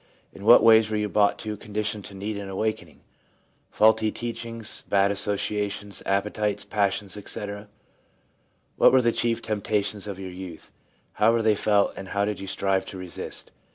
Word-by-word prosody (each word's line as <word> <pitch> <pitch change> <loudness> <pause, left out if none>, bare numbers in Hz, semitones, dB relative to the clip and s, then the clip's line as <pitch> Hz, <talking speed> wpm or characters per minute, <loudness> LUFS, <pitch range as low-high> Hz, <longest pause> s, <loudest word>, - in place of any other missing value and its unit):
In 100 - -10
what 120 +2 +8
ways 110 -1 +6
were 110 - -1
you 105 0 -1
brought 100 -1 +3
to 110 -1 -5
a - - -8
condition 105 0 -3
to 100 - -11
need 105 +2 -4
an 100 -1 -6
awakening: 110 +3 -3 0.4
— - - -38 0.3
faulty 110 0 +3
teachings, 115 -1 -5
bad 100 0 +3
associations, 105 0 -2
appetites, 105 +1 0
passions, 100 -1 -1
etc.? 105 0 -6 1.1
What - - +7
were 130 -1 +4
the 115 - +3
chief 115 0 0
temptations 105 -1 -1
of 100 -2 -5
your 95 -1 -7
youth? 90 -2 -9 0.4
How 110 +2 +4
were 115 -1 +1
they 110 -1 +4
felt, 105 -1 +2
and 95 - -8
how 100 +1 0
did 105 -1 -3
you 95 - -7
strive 95 0 0
to 95 - -7
resist 90 -2 -7
105 Hz, 175 wpm, -25 LUFS, 100-110 Hz, 1.1 s, what